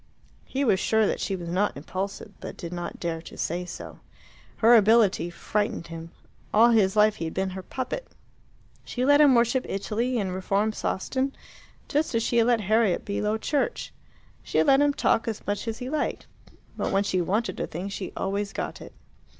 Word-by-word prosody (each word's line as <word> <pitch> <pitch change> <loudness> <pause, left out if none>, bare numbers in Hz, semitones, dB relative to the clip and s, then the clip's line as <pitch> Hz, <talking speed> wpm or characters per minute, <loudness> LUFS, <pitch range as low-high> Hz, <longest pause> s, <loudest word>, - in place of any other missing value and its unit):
He 270 +1 -2
was 190 -6 +3
sure 220 +1 +3
that - - -1
she 195 - -1
was 175 -2 -6
not 185 +1 0
impulsive, 190 +7 -5
but - - -8
did 170 -1 -6
not 175 0 -5
dare 165 -2 -3
to - - -12
say 175 +2 -2
so. - - -9 0.6
Her 230 +2 +6
ability 215 -6 +5
frightened 205 +1 -2
him. 165 0 -7 0.4
All 230 +3 +6
his 205 -4 +3
life 215 0 +4
he 165 - -3
had 160 - -5
been 190 0 -1
her 190 +1 -6
puppet. 265 - -5 0.8
She 250 0 -2
let 285 +2 +6
him 280 -4 +7
worship 240 +2 +3
Italy, 230 +6 -1
and 190 -4 -1
reform 195 +3 0
Sawston 260 +8 -2 0.5
just 300 -4 0
as 230 - +2
she 235 - 0
had 230 0 +4
let 240 -2 +3
Harriet 215 -2 +2
be 200 - -2
Low 210 +1 0
Church. 295 - -2 0.5
She - - -3
had - - +4
let 275 -1 +5
him 290 0 +4
talk 225 - +2
as 220 -2 -4
much 205 +3 -2
as 225 -1 -2
he 250 - -6
liked. 305 +3 -2 0.5
But - - -2
when 195 +1 +2
she 185 -2 0
wanted 210 +7 -1
a - - -2
thing 175 +5 -5
she 200 -1 -5
always 200 +1 -2
got - - -4
it. - - -11
210 Hz, 200 wpm, -26 LUFS, 190-235 Hz, 0.8 s, him